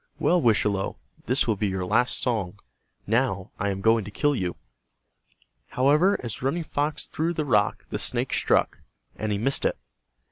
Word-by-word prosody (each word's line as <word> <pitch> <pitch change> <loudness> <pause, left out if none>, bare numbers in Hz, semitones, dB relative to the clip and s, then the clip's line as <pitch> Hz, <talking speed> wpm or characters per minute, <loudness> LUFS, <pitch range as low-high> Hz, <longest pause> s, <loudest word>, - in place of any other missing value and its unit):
Well, 175 -1 +2
Wischalowe, 105 -4 +1 0.3
this 125 +3 +3
will 110 - +1
be 105 +1 -1
your 95 -1 -2
last 125 +7 +1
song. 105 -7 -1 0.5
Now 110 -4 0
I 100 - 0
am 95 0 -3
going 115 +1 +3
to - - -7
kill 145 +7 +1
you." 90 -6 -2 1.1
However, 150 +10 +3
as 115 -4 -5
Running 145 +6 -1
Fox 145 -1 -2
threw 165 +2 -2
the 155 - -1
rock 105 -6 +1
the - - -2
snake - - 0
struck, - - +1 0.4
and 110 -1 -3
he 100 - 0
missed 135 +6 +1
it. - - 0
115 Hz, 170 wpm, -25 LUFS, 100-145 Hz, 1.1 s, this